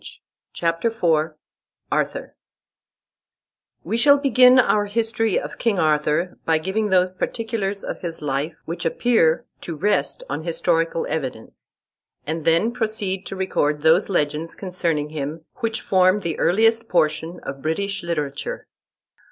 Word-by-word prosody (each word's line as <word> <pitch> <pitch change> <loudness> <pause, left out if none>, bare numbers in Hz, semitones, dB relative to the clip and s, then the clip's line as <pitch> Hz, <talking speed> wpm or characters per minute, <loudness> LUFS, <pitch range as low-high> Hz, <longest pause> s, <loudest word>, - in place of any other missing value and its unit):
] - - -66
CHAPTER 165 +5 0
IV 165 -8 +1 0.6
ARTHUR - - -2 1.5
We 215 +7 -1
shall 285 +4 +6
begin 255 -2 +6
our 210 -4 +4
history 225 0 0
of - - -8
King 230 -5 +1
Arthur 155 +2 +1
by 160 -1 +2
giving 195 +6 -1
those 185 -1 +3
particulars 205 -1 -3
of - - -5
his 170 -2 -5
life 145 +2 -2
which 170 +1 -4
appear 165 -3 +2 0.2
to 170 - -5
rest 190 -3 0
on 145 +3 -3
historical 165 0 0
evidence; 130 -7 -6 0.5
and 160 +1 -4
then 170 +8 +3
proceed 215 -5 -3
to - - -6
record 150 -6 0
those 165 +6 +4
legends 155 -2 -1
concerning 170 -6 -2
him 155 +1 -5
which 230 -1 -2
form 185 +1 +3
the 170 -3 -3
earliest 225 +4 +3
portion 160 +1 0
of 135 0 -6
British 200 +7 -2
literature. 150 -5 -4
175 Hz, 135 wpm, -22 LUFS, 155-210 Hz, 1.5 s, shall